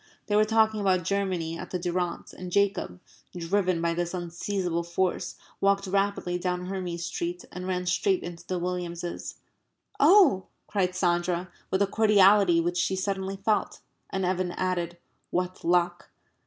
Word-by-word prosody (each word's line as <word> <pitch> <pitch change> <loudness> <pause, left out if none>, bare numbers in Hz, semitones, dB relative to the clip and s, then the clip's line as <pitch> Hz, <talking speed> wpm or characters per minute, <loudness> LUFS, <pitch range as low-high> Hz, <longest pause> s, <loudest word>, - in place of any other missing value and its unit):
They 205 - 0
were 215 +1 +5
talking 220 -1 +3
about 185 -3 +2
Germany 180 -3 -1
at 180 - -7
the 180 - -2
Durrants, 175 0 -3
and 180 -1 -8
Jacob 200 - +1 0.4
(driven 180 +1 +1
by 170 0 +2
this 175 +1 -2
unseizable 175 0 -2
force) 170 +2 -1 0.2
walked 195 0 +2
rapidly 195 -2 0
down 180 0 -2
Hermes 180 -3 -4
Street 175 +1 -4
and 180 +1 -6
ran 180 -1 -1
straight 360 - +1
into 170 0 -7
the 185 - -1
Williamses. 175 -1 -4 0.6
"Oh!" 335 - +6 0.2
cried 185 -3 -1
Sandra, 175 0 0 0.2
with 190 +1 +2
a - - +4
cordiality 200 -3 +5
which 175 +1 0
she 190 - +1
suddenly 195 0 -2
felt. 210 +2 0 0.3
And 190 -1 -1
Evan 180 -1 0
added, 175 -2 -2 0.3
"What 180 +1 -2
luck!" 175 0 +1
180 Hz, 150 wpm, -27 LUFS, 175-195 Hz, 0.6 s, Oh